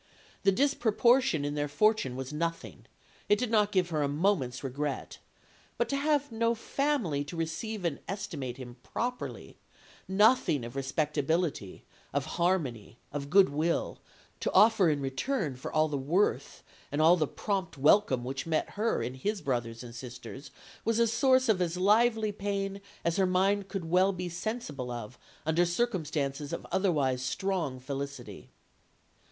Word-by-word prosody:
The 195 - +4
disproportion 240 - +3
in 145 - -2
their 145 0 -1
fortune 210 - +2
was 130 +2 -5
nothing; 165 +2 -4 0.4
it 210 - +5
did 245 0 -2
not 210 -2 +3
give 185 -3 +2
her 155 -2 0
a 145 - +2
moment's 145 -5 0
regret; 140 +2 -4 0.6
but - - +1
to 280 - 0
have 290 -1 +1
no 230 +1 +1
family 230 - -1
to 165 +3 -7
receive 180 +5 -3
and 160 -4 -1
estimate 150 -11 -4
him 125 -1 -9
properly, 245 - -5 0.5
nothing 190 - +3
of 120 +2 -9
respectability, 145 - -1 0.3
of - - +1 0.2
harmony, 140 - 0 0.2
of 140 -1 -4
good 195 +1 +6
will, 155 +4 -1 0.4
to - - -1
offer 210 -5 +6
in 145 -2 0
return 140 - -2
for 125 - -7
all 155 0 +3
the 145 -2 -2
worth 170 +10 0 0.3
and 145 - -2
all 160 +3 +7
the 155 -4 0
prompt 190 -3 -3
welcome 140 -2 +4
which 135 +4 -4
met 160 -1 0
her 220 +3 0
in 125 - -3
his 200 +11 -2
brothers 120 -5 -3
and 120 -1 -9
sisters, 125 +3 -9 0.3
was 230 -1 +1
a 235 - +5
source 260 +3 +3
of 210 -5 +3
as 175 0 -1
lively 215 +3 +3
pain 200 -1 -3 0.2
as 170 0 +1
her 190 -1 +3
mind 195 +2 +2
could 195 -4 -4
well 180 +4 +3
be 180 -1 -4
sensible 170 - -4
of 120 0 -7 0.3
under 160 +2 +3
circumstances 155 - -1
of - - -5
otherwise 145 -10 +1
strong 155 -1 -2
felicity." 140 +2 -6
170 Hz, 155 wpm, -30 LUFS, 140-205 Hz, 0.6 s, all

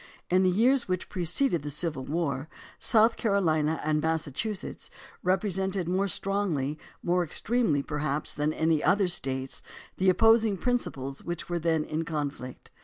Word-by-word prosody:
In 185 +1 +5
the 185 - +4
years 240 +7 +3
which 185 -1 -2
preceded 180 - +1
the 145 - -5
Civil 150 -2 -2
War 145 -2 -2 0.3
South 225 +1 +4
Carolina 160 -7 +1
and 150 0 +1
Massachusetts 160 - -3 0.3
represented 190 -1 0
more 190 +3 +1
strongly, 175 -8 -1 0.2
more 180 0 +2
extremely, 170 - 0
perhaps, 150 0 -2
than 150 +1 0
any 160 -1 +1
other 200 -1 +3
States 135 -6 -2 0.4
the 190 0 +3
opposing 225 +1 +4
principles 140 - -2
which 175 0 -5
were 175 0 -1
then 160 -1 +1
in 155 +1 -3
conflict. 145 -5 -5
170 Hz, 140 wpm, -28 LUFS, 150-195 Hz, 0.4 s, In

